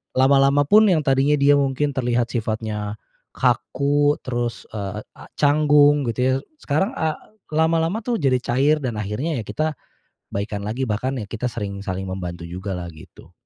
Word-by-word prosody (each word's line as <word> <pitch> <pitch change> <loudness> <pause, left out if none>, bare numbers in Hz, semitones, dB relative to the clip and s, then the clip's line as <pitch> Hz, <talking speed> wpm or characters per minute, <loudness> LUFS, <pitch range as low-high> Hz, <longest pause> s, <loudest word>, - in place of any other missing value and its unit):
lama-lama 135 +2 +4
pun, 210 +8 +5
yang 160 -5 +3
tadinya 135 +2 +3
dia 140 +1 +5
mungkin 140 +1 0
terlihat 120 -2 0
sifatnya 110 -2 -3 0.4
kaku, 145 +1 +2
terus, 120 -2 -3
eee, 105 0 -5 0.2
a - - -11
canggung 145 -1 +4
gitu 115 - -4
ya. 130 0 +3 0.3
Sekarang 190 - 0
a 160 -1 -1 0.4
lama-lama 165 +5 +2
tuh 235 0 -1
jadi 135 -5 +2
cair, 145 +6 +2
dan 120 -5 -3
akhirnya 125 +9 -2
ya - - -8
kita 155 +7 -2 0.5
baikan 100 0 -4
lagi. 125 +5 -2
Bahkan 120 +2 -2
ya - - -12
kita 120 +2 -2
sering 100 -4 -5
saling 95 -1 -4
membantu 90 -2 -5
jugalah, 90 0 -5
gitu. 80 - -16
130 Hz, 155 wpm, -22 LUFS, 105-145 Hz, 0.5 s, pun